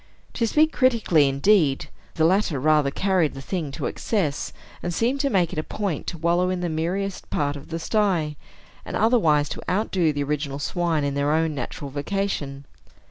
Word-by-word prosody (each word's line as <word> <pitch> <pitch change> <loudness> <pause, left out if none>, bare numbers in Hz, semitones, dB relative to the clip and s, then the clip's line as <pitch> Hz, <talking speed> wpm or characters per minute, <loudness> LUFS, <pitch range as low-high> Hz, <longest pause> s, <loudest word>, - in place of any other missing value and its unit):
To 230 - 0
speak 310 +6 +3
critically, 220 - +3
indeed, 140 0 +3 0.3
the 160 - +3
latter 180 -5 +2
rather 150 0 +3
carried 185 0 +1
the - - -6
thing 160 +2 -3
to - - -4
excess, 170 -11 -1 0.3
and 175 - -2
seemed 240 +9 0
to 280 0 +1
make 180 -7 +1
it - - -2
a - - -1
point 195 -7 -3
to 170 - -4
wallow 170 +3 +2
in 185 -1 -2
the 175 - -1
miriest 180 +5 -2
part 145 -1 0
of 140 - -9
the 165 - -3
sty, 170 -4 0 0.5
and - - -6
otherwise 165 -11 +3
to - - -5
outdo 185 -4 +1
the 145 -1 -2
original 140 -1 -2
swine 165 +1 0
in 140 0 -1
their 140 +1 +1
own 160 0 +1
natural 140 +1 -5
vocation. 145 -3 -3
165 Hz, 185 wpm, -24 LUFS, 145-195 Hz, 0.5 s, speak